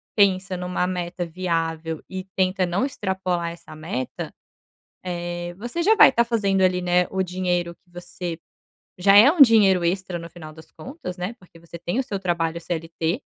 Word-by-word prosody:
pensa 195 -2 +2
numa 180 0 -2
meta 175 -1 -3
viável 165 -2 -3
e 185 0 -5
tenta 185 0 +1
não 180 +9 0
extrapolar 190 -8 -2
essa 170 -2 -12
meta, 155 -5 -5 1.0
eh, 175 0 -5
você 240 - -4
já 435 +5 +4
vai 270 - +8
tá 235 - +4
fazendo 200 -5 +1
ali, 180 -1 +3
né, 180 0 +2
o 190 0 0
dinheiro 180 -1 -2
que 175 - -35
você 175 -1 -6 0.6
já 195 +2 +5
é 225 +7 +9
um 330 0 -2
dinheiro 200 -8 +5
extra 180 0 -1
no 170 0 -8
final 160 -2 -11
das 160 0 -15
contas, 265 - -8
né, 180 +6 -4
porque 180 -5 -19
você 170 0 -11
tem 175 +8 -3
o - - 0
seu 205 -6 -4
trabalho 170 -3 -1
CLT. 165 - -3
180 Hz, 175 wpm, -23 LUFS, 170-195 Hz, 1.0 s, é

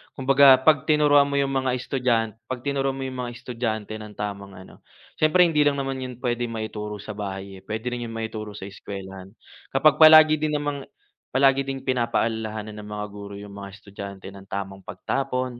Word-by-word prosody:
Kumbaga, 135 0 +6
'pag 150 -3 +4
tinuruan 145 -2 +5
mo 140 - -3
'yong 140 -1 +1
mga 130 -2 0
estudyant 120 -3 0 0.2
'pag 125 -1 -5
tinuruan 135 -1 -1
mo 135 - -5
'yong 130 -1 -5
mga 120 - -6
estudyante 115 -3 -4
ng 105 -1 -10
tamang 100 -1 -6
ano, 95 - -14 0.4
siyempre 165 +4 +5
hindi 155 -3 +3
lang 145 - +2
naman 135 -1 -3
'yon 125 -1 -7
puwedeng 120 -1 -1
maituro 105 -1 -5
sa 105 - -6
bahay 95 -2 -6
eh, - - -21
puwede 110 +3 -5
rin 120 -1 -4
'yon 115 - -8
maituro 110 -2 -5
sa - - -8
eskuwelahan. 95 0 -9 0.4
Kapag 150 +3 +4
palagi 155 -1 +8
din 150 0 0
namang 145 -2 -3 0.5
palagi 135 0 +4
din 135 -1 -4
pinapaalalahanan 110 -4 -1
ng 105 - -9
mga 105 0 -3
guro 100 0 -9
'yong 100 0 -9
mga 100 0 -8
estudyante 100 -1 -9
nang 100 0 -13
tamang 95 -1 -5
pagtapon, 130 -2 -3
120 Hz, 185 wpm, -24 LUFS, 105-135 Hz, 0.5 s, palagi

